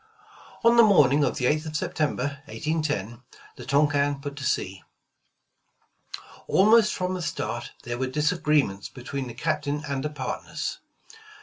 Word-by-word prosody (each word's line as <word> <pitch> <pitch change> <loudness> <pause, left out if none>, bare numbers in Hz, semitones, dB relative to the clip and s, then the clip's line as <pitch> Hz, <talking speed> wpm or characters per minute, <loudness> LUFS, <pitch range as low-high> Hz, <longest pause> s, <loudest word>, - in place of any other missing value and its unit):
' 430 - -23
' - - -22
On 235 +1 +6
the - - +10
morning 150 - +5
of - - 0
the 125 - -1
8th 155 +4 +1
of 155 - -6
September, 145 -3 -2
1810, 150 - -3 0.3
the - - -11
Tonquin 145 0 +2
put 140 0 -6
to 145 - -6
sea. 95 -6 -1 1.7
Almost 215 +2 +5
from 185 0 -2
the 185 - -3
start 155 - -4
there 120 0 -4
were 130 - 0
disagreements 150 - +1
between 135 +1 -6
the 120 - -8
Captain 145 +1 -2
and 140 -1 -2
the 150 - -1
partners. 150 - -5
145 Hz, 150 wpm, -26 LUFS, 135-160 Hz, 1.7 s, the